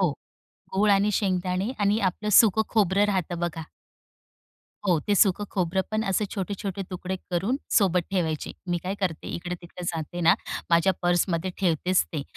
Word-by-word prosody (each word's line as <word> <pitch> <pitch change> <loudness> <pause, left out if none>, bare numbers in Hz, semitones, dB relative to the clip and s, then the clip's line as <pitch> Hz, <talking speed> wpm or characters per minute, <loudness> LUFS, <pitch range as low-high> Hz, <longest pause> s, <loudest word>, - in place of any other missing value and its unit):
हो, - - +3 0.6
गूळ 205 +2 +3
आणि 200 +1 +4
शेंगदाणे 185 +1 0
आणि 205 +1 +2
आपलं 210 +4 -6
सुक 220 0 +6
खोबरं 200 -2 +3
राहतं 185 -4 -1
बघा. 170 -2 -3 1.2
हो, 175 -4 +3
ते 205 +7 0
सुक 195 0 +4
खोबरं 185 0 0
पण 215 0 0
असे 195 +1 +1
छोटे-छोटे 195 -1 -4
तुकडे 185 +1 -4
करून 190 +9 0 0.2
सोबत 185 -4 +4
ठेवायचे. 165 -5 -1 0.2
मी 175 0 0
काय 190 +2 -3
करते 180 -5 -2
इकडे-तिकडे 175 0 -7
जाते 165 +1 -4
ना, 165 - +6 0.4
माझ्या 170 +3 +4
पर्समध्ये 175 0 +1
ठेवतेच 180 0 +2
ते. 155 -4 -5
185 Hz, 150 wpm, -26 LUFS, 175-200 Hz, 1.2 s, सुक